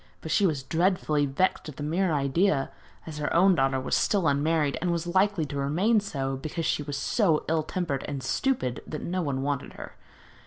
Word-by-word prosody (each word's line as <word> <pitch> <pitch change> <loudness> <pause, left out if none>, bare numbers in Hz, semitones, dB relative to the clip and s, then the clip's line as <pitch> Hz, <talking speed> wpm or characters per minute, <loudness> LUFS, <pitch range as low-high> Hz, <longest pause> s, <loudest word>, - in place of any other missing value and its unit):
But 160 - -6
she 195 +5 +4
was 145 -6 -2
dreadfully 160 -2 +1
vexed 155 +4 0
at 150 - -9
the 145 - -6
mere 170 +4 0
idea, 140 +2 +1 0.3
as 155 -2 -7
her 145 - -2
own 190 +3 +6
daughter 135 -4 +1
was 130 - -1
still 195 -6 +2
unmarried, 145 +1 +1
and 180 - 0
was 170 0 -1
likely 190 -1 +2
to 145 - -7
remain 175 +12 +2
so, 135 -9 -3
because 155 +4 -4
she - - 0
was 145 -1 -4
so 160 - +1
ill 160 0 +1
tempered 155 -4 -3
and 140 -3 -4
stupid 130 - -1
that 155 - -5
no 180 +2 -2
one 135 -4 -2
wanted 140 -2 -3
her. - - -9
155 Hz, 200 wpm, -27 LUFS, 140-180 Hz, 0.3 s, own